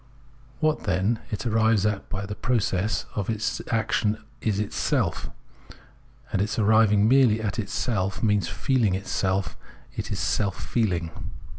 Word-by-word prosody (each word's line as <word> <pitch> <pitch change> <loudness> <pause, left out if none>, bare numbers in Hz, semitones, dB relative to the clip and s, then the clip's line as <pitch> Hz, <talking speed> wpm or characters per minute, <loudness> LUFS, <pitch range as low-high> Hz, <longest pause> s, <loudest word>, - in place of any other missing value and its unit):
What, 155 -4 +1
then, 100 +4 +1
it 110 +5 -4
arrives 110 -2 +3
at 105 -2 -1
by 100 -1 -3
the 105 - -5
pro 125 +4 0
cess 100 0 0
of 105 -1 -3
its 110 0 -1
action 110 -1 +1 0.2
is 105 -3 0
itself; 105 - -1 1.0
and 95 - +2
its 105 +2 -1
arriving 110 -1 +4
merely 125 -3 +5
at 110 +1 -2
itself 100 -2 -1
means 105 -5 +2
feehng 120 -9 +1
itself, 95 0 -1 0.4
is - - -4
its - - -2
seH 100 -3 0
feehng. 90 -8 -1
105 Hz, 140 wpm, -25 LUFS, 100-115 Hz, 1.0 s, merely